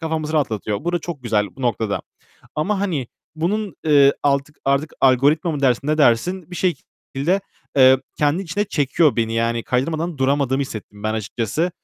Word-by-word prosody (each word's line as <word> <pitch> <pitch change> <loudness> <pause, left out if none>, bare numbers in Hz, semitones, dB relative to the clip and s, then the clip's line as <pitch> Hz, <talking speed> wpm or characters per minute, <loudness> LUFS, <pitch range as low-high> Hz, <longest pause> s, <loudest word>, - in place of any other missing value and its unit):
kafamızı 160 -1 -2
rahatlatıyor. 110 -8 -1
Bu 175 - -1
da 175 - +1
çok 160 -5 -7
güzel 105 -3 +1
bu 135 - -9
noktada. 110 -4 0 0.5
Ama 195 +6 0
hani 165 -11 -1 0.3
bunun, 190 +2 -2
eee, 140 -2 +6
altık 140 +1 0
artık 140 +3 +1
algoritma 140 +6 +3
mı 150 -3 -3
dersin, 130 0 +2
ne 155 +1 +1
dersin? 160 +8 +2
Bir 180 - -6
şekilde, 175 -1 -2 0.4
eee, 130 0 +7 0.2
kendi 150 +6 +1
içine 195 +4 -2
çekiyor 150 -4 +1
beni. 115 -1 0
Yani 115 0 0
kaydırmadan 155 +5 -1
duramadığımı 135 0 +1
hissettim 105 -5 -8
ben 110 0 -1
açıkçası. 115 - -2
140 Hz, 160 wpm, -21 LUFS, 125-165 Hz, 0.5 s, eee